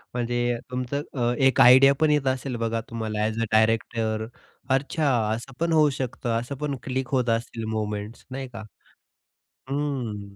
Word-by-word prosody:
म्हणजे 120 0 0
तुमचं 125 +3 -2
अ, 120 -2 +1
एक 135 -2 +4
आयडिया 130 +3 +8
पण 155 -1 +4
येत 145 -2 +1
असेल. 130 0 -1
बघा 115 0 -1
तुम्हाला 110 -2 -3
अ‍ॅज 110 +1 -1
अ - - +1
डायरेक्टर 110 0 +1 0.4
अच्छा, 140 +3 +1 0.3
असं 120 +4 -6
पण 170 0 0
होऊ 155 -2 +5
शकतं, 130 -2 -4
असं 120 +4 -6
पण 145 0 -2
क्लिक 130 +1 -2
होत 125 -2 +2
असतील 115 0 -2
मूव्हमेंट्स 105 0 -4
नाही 135 0 -5
का? 110 - -7 1.1
हं. 125 -9 -3
120 Hz, 155 wpm, -25 LUFS, 115-135 Hz, 1.1 s, आयडिया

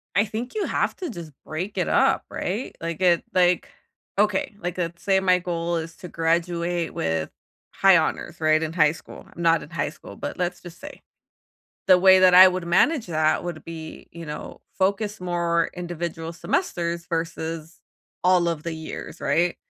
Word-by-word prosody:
I 205 - +4
think 225 +4 -5
you 425 - -1
have - - -1
to 360 -5 -5
just 170 -8 -8
break 175 +6 -5
it - - 0
up, - - +3
right? 210 +8 -4
Like, 165 -1 -4
the 175 -2 +3
like, 180 -1 +3 0.5
okay, 210 0 +1
like, 180 -1 -4
let's 170 -1 -3
say 190 -1 +3
my 185 -1 +3
goal 170 -1 -2
is 165 0 -5
to 180 - -9
graduate 170 +1 -1
with 80 -1 -1 0.4
high 195 -2 +5
honors, 165 +1 -1
right, 155 0 +3
in 160 - -2
high 155 -3 +4
school. - - -12
I'm 170 - -7
not 165 -1 +3
in - - -11
high 150 -3 -2
school, 100 -9 -13
but - - -5
let's 180 0 -2
just 175 -1 -12
say. - - -10 0.8
The 185 -1 +7
way 190 0 +7
that 185 -1 +6
I 185 +1 +11
would 185 -1 0
manage 235 - +3
that 155 -2 +1
would 175 -3 -6
be, 160 -1 -9
you 170 -1 -9
know, 150 0 -7 0.2
focus 200 +2 0
more 170 -2 0
individual 170 -2 -5
semesters 170 - -2
versus 165 -1 -4 0.4
all 180 -1 +4
of 165 -3 -2
the 170 - -4
years, 160 0 -8
right, 175 +1 +1
170 Hz, 180 wpm, -24 LUFS, 165-185 Hz, 0.8 s, I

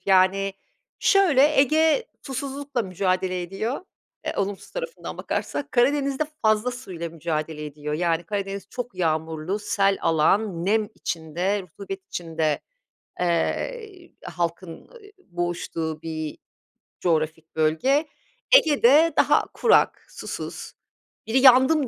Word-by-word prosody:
Yani, 195 +1 +3 0.5
şöyle, 305 -8 +4
Ege 315 - +3 0.2
susuzlukla 275 -1 -3
mücadele 185 -1 -1
ediyor, 195 +8 -3 0.5
eee, - - 0
olumsuz 200 0 -3
tarafından - - -6
bakarsak, 285 - -3
Karadeniz'de 275 +3 +2 0.2
fazla 215 +2 +3
suyla 185 -10 -6
mücadele 160 -1 -4
ediyor. 150 +1 -5
Yani, 170 +1 0
Karadeniz 200 +1 -4
çok 245 -2 -5
yağmurlu, 160 +1 -1
sel 200 -2 +1
alan, 170 +3 +2
nem 215 0 +2
içinde, 175 +5 -2
rutubet 195 +2 -9
içinde, 160 -4 -2 0.6
eee, 365 - -2
halkın, 170 +1 -3
ııı, 485 - -17 0.3
boğuştuğu 175 -3 -3
bir 155 -2 -5 0.6
coğrafik 160 -1 -1
bölge. 160 - +2 0.5
Ege'de 300 - +5
daha - - +4
kurak, 470 - +3
susuz, - - -7 0.5
biri 240 +4 +3
"yandım" 265 +3 +6
195 Hz, 105 wpm, -24 LUFS, 165-265 Hz, 0.6 s, yandım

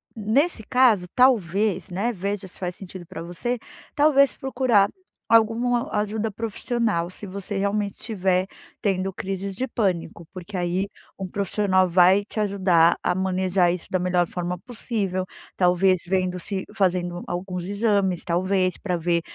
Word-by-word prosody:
nesse 225 +6 +1
caso, 235 -6 +3
talvez, 205 -6 +2
né, 200 +7 -1
veja 200 0 -3
se - - -11
faz 180 -1 -3
sentido 185 -2 -10
pra 165 - -8
você, 175 +9 -3 0.4
talvez 285 -2 +5
procurar 245 -6 +2 0.4
alguma 235 +4 +3
ajuda 210 +1 -1
profissional, 220 -3 -2
se 185 - -8
você 200 +1 -5
realmente 200 0 0
estiver 190 -4 0 0.3
tendo 195 -1 0
crises 195 +1 -4
de 255 - -1
pânico, 180 -8 -2
porque 185 +1 -7
aí 180 +3 -1 0.3
um 195 - -4
profissional 190 0 +1
vai 185 +3 +5
te 220 - -11
ajudar 185 -5 +3
a - - 0
manejar 185 -1 +1
isso 180 -1 -4
da 185 - +1
melhor 180 -1 +1
forma 180 0 -4
possível. 205 -5 -3 0.3
Talvez 180 0 +3
vendo 185 0 0
se 190 +2 -4
fazendo 180 -3 0
alguns 180 0 -4
exames, 200 -2 0
talvez 185 +1 +1
pra 180 -3 -2
ver 170 0 +1
190 Hz, 145 wpm, -24 LUFS, 180-215 Hz, 0.4 s, talvez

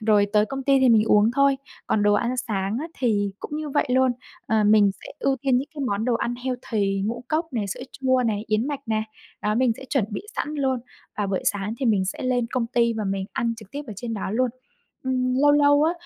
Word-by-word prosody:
rồi 210 -2 +4
tới 210 0 +4
công 270 0 -5
ty 275 -1 +4
thì 260 - +5
mình 220 -2 +5
uống 210 +1 +4
thôi. 275 +1 +3 0.3
Còn 210 - +1
đồ 205 0 +4
ăn 240 +4 0
sáng 195 0 -1
á 320 - -3
thì 205 -5 +1
cũng 295 - -5
như 305 -1 -4
vậy 290 - +1
luôn, 260 0 +4 0.3
ờ, 220 -1 +2
mình 205 -1 +5
sẽ - - -14
ưu 270 -1 +1
tiên 265 0 +1
những 275 +3 -4
cái 290 - -6
món 205 0 -1
đồ 245 - +1
ăn 235 +1 -1
healthy 220 -6 -1
ngũ 240 +2 -3
cốc 320 -1 -1
này, 215 -4 -1
sữa 195 - -5 0.2
chua 260 -1 +3
này, 210 -1 -1
yến 215 +4 +1
mạch 285 -2 -3
nè, 220 -1 0 0.4
đó, 210 0 +1
mình 245 -1 +3
sẽ - - -10
chuẩn 265 -8 +2
bị - - -4
sẵn 300 - -2
luôn. 265 -4 0 0.4
Và 205 - 0
buổi 195 -1 -1
sáng 205 +2 -1
thì 260 - 0
mình 200 -4 +3
sẽ 190 - -4
lên 250 -2 +1
công 245 -3 0
ty 235 -1 +2
và 220 -2 -3
mình 195 0 -1
ăn 230 -1 -1
trực 215 -3 -13
tiếp 290 +1 -5
ở 215 - -6
trên 230 +1 -4
đó 195 -2 -3
luôn. 250 +3 +1 0.5
Ừm, 255 -1 0
lâu 290 0 +6
lâu 290 0 +5
á, 320 +2 +3
235 Hz, 250 wpm, -24 LUFS, 210-265 Hz, 0.5 s, lâu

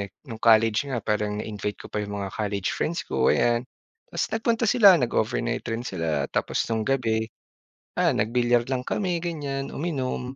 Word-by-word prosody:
eh, 100 - -4 0.2
no'ng 115 -2 -6
college 110 0 +4
nga 125 -4 -2
parang 105 -1 -1
na-invite 105 -1 -4
ko - - -6
pa - - -1
'yong 100 0 -5
mga 95 -1 -4
college 100 -3 -1
friends 170 +3 -2
ko, - - +1
ayan. 120 0 +2 0.5
Tas - - -1
nagpunta 230 +1 +1
sila, 205 -6 +8
nag-overnight 115 -3 0
rin 115 +1 -2
sila 80 - -1
tapos - - 0
no'ng 110 -1 0
gabi, 115 -5 +1 0.7
ah, - - +3
nag-bilyar 120 +2 +2
lang 130 -2 -1
kami 185 -4 -1
ganyan, 140 -5 -3
uminom. 135 -5 -3
120 Hz, 170 wpm, -25 LUFS, 105-135 Hz, 0.7 s, sila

